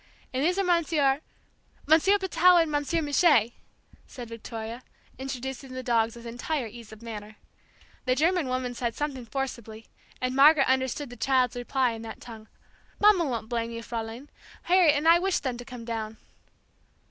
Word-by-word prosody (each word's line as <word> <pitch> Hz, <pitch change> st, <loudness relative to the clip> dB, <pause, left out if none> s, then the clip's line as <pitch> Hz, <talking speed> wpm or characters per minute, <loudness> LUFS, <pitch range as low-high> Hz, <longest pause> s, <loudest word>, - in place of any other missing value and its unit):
And 260 Hz, +2 st, 0 dB
these 360 Hz, +4 st, +1 dB
are 395 Hz, -, +2 dB
Monsieur 310 Hz, -6 st, +2 dB, 0.3 s
" -, -, -34 dB
"Monsieur 330 Hz, +7 st, +5 dB
Patou 365 Hz, -2 st, +4 dB
and 325 Hz, -2 st, +1 dB
Monsieur 295 Hz, +3 st, 0 dB
Mouche," 290 Hz, -, +4 dB, 0.6 s
said 245 Hz, -3 st, -9 dB
Victoria, 230 Hz, +1 st, -7 dB, 0.4 s
introducing 265 Hz, 0 st, -6 dB
the 255 Hz, 0 st, -5 dB
dogs 230 Hz, -2 st, +1 dB
with 235 Hz, 0 st, -12 dB
entire 245 Hz, +4 st, -3 dB
ease 225 Hz, 0 st, -11 dB
of 220 Hz, +1 st, -13 dB
manner. 215 Hz, -2 st, -8 dB, 0.7 s
The 255 Hz, 0 st, +2 dB
German 330 Hz, +2 st, +1 dB
woman 255 Hz, -1 st, -2 dB
said 235 Hz, -1 st, -3 dB
something 270 Hz, -5 st, -4 dB
forcibly, 230 Hz, -4 st, -5 dB, 0.3 s
and 255 Hz, 0 st, -2 dB
Margaret 280 Hz, 0 st, +6 dB
understood 260 Hz, +1 st, 0 dB
the 245 Hz, -, -10 dB
child's 255 Hz, 0 st, +1 dB
reply 245 Hz, +1 st, 0 dB
in 225 Hz, -1 st, -7 dB
that 225 Hz, -, -8 dB
tongue: 220 Hz, -2 st, -11 dB, 0.5 s
"Mamma 410 Hz, -5 st, +5 dB
won't 235 Hz, -5 st, -3 dB
blame 230 Hz, -1 st, -2 dB
you, 230 Hz, 0 st, -7 dB
Fraulein; 230 Hz, +4 st, -6 dB, 0.3 s
Harriet 350 Hz, -4 st, +4 dB
and 295 Hz, +3 st, 0 dB
I 335 Hz, +1 st, +7 dB
wished 380 Hz, +1 st, 0 dB
them 255 Hz, -3 st, -2 dB
to 245 Hz, -, -9 dB
come 245 Hz, -3 st, -9 dB
down!" 220 Hz, -1 st, -4 dB
255 Hz, 170 wpm, -27 LUFS, 230-300 Hz, 0.7 s, I